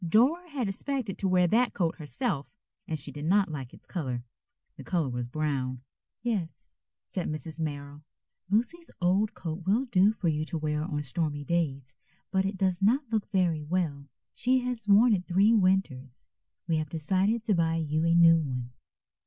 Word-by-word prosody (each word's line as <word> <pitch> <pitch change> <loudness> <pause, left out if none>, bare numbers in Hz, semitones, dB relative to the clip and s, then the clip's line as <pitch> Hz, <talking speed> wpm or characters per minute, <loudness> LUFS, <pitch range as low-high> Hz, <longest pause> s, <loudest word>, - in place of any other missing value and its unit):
Dora 265 - +3
had 270 -7 -2
expected 220 +1 -3
to 195 - 0
wear 180 -1 +4
that 235 +7 +2
coat 170 -4 0
herself, 145 -1 -2 0.4
and 160 - -2
she 145 0 -8
did 145 +2 -6
not 190 +1 +3
like 135 -4 -6
its - - -17
color. 130 -9 -3 0.5
The - - -10
color 170 -7 0
was 120 -1 -3
brown. 130 -3 -2 0.4
"Yes," 165 - -3 0.3
said 185 - -4
Mrs. 155 +1 -6
Merrill. 145 -2 -5 0.5
"Lucy's 245 - 0
old 190 +4 +2
coat 165 +1 -5
will 225 +7 +3
do 205 -4 +4
for 210 -5 -3
you 155 -1 +1
to 165 - -4
wear 150 -1 -1
on 150 -3 -3
stormy 145 +1 -2
days, 140 -5 -1 0.4
but 190 0 +2
it 195 0 -2
does 185 -1 +1
not 240 +9 +3
look 220 -2 -1
very 180 -6 +1
well. 150 -3 -2 0.3
She 255 +1 +2
has 245 -3 -4
worn 215 +4 +6
it 180 -3 -1
three 195 +5 +4
winters. 165 - 0 0.4
We 165 - +1
have 155 -1 -2
decided 190 +8 0
to 215 - +1
buy 165 -2 +2
you 155 -1 0
a 165 0 +3
new 165 -1 +7
one." 125 -5 -4
170 Hz, 180 wpm, -28 LUFS, 150-205 Hz, 0.5 s, new